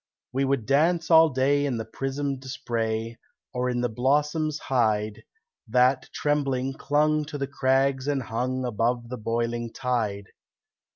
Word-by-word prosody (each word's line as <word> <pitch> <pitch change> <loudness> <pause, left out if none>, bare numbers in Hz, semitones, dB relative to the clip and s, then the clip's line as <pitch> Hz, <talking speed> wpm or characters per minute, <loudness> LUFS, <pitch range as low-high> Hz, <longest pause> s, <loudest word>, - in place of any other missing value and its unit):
We 135 +1 +1
would 135 -5 0
dance 160 +5 +2
all 160 0 +8
day 140 +1 +2
in 135 -4 -1
the 110 - -4
prismed 135 +2 -3
spray, 115 -3 -3 0.3
Or 125 0 0
in 120 -1 -1
the 125 - +1
blossoms 150 +6 +1
hide, 110 -6 0 0.5
That, 125 +3 +3
trembling, 135 -3 0
clung 150 +2 +1
to 150 0 -6
the 140 - -1
crags 135 -1 +1
and 140 -3 0
hung 125 +3 -2
Above 120 +1 -1
the 125 - -5
boiling 115 +1 -2
tide. 110 -6 -2
130 Hz, 140 wpm, -26 LUFS, 120-145 Hz, 0.5 s, all